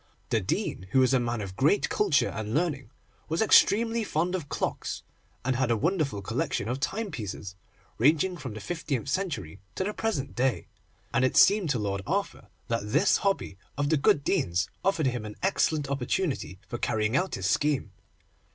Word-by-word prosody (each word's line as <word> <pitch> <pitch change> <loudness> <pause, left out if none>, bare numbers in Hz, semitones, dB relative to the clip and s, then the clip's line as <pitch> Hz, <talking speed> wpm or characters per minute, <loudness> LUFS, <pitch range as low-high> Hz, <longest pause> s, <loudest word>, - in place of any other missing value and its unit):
The - - +2
Dean, 95 - -2
who 130 - +5
was 130 0 +4
a 130 - +4
man 120 -2 -2
of 95 -2 -6
great 150 - +3
culture 190 -9 +2
and 110 0 -4
learning, 145 -7 -1 0.4
was 160 - -1
extremely 225 +1 +4
fond 175 -2 -1
of 170 -6 -3
clocks, - - -3 0.4
and 130 0 +1
had 130 0 +1
a 115 - +2
wonderful 150 - 0
collection 125 0 -2
of 125 +3 -2
timepieces, 135 - -4 0.4
ranging 155 +8 +3
from 130 -10 -7
the - - -6
fifteenth 150 -6 -3
century 130 - -3 0.2
to - - -1
the 210 +2 -2
present 210 -14 -2
day, 125 -9 0 0.5
and 120 +2 +3
it 130 - +2
seemed 200 -4 +6
to 130 - +1
Lord 100 -2 -2
Arthur 195 +5 -2 0.2
that 110 -3 -2
this 165 - +4
hobby 195 - -1 0.2
of 145 0 0
the 160 - +3
good 140 +1 +3
Dean's 100 - 0
offered 190 -6 +1
him 120 -3 -1
an 105 -1 -7
excellent 155 -6 +1
opportunity 140 - -2
for 120 - -5
carrying 110 +2 0
out 185 +7 +1
his 95 - -4
scheme. 140 0 +1
140 Hz, 180 wpm, -28 LUFS, 115-175 Hz, 0.5 s, seemed